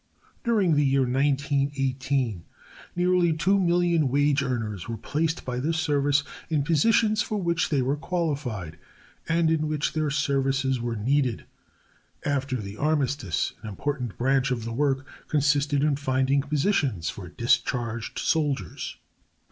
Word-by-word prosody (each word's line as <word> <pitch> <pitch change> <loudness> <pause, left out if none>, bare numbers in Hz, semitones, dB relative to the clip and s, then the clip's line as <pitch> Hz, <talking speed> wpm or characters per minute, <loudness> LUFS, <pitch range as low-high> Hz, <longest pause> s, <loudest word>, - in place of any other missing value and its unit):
During 210 -8 +2
the 145 0 +3
year 135 -1 +3
1918 135 - 0 0.5
nearly 180 -1 +3
two 190 +5 +2
million 170 -4 +2
wage 145 +1 +2
earners 115 -7 -3
were 115 - -3
placed 160 +8 -2
by 125 -1 -3
this 160 +5 0
service 145 -2 +2 0.3
in 155 -3 +1
positions 210 +7 +3
for 210 0 -2
which 170 -3 0
they 140 -4 +1
were 135 +3 +1
qualified 140 - -3 0.5
and 165 0 +3
in 155 -1 +1
which 150 -1 -1
their 155 -1 0
services 135 -2 0
were 120 -1 -2
needed. 125 +2 0 0.8
After 140 -2 0
the 105 -3 -6
armistice 140 - 0
an 110 - -6
important 125 +1 -3
branch 135 +2 +2
of 120 -3 -2
the 115 - -4
work 135 +1 0 0.2
consisted 145 -1 +2
in 150 -2 +2
finding 135 0 +1
positions 140 - 0
for 90 -3 -9
discharged 120 +1 -1
soldiers. 140 - -1
140 Hz, 135 wpm, -26 LUFS, 125-155 Hz, 0.8 s, the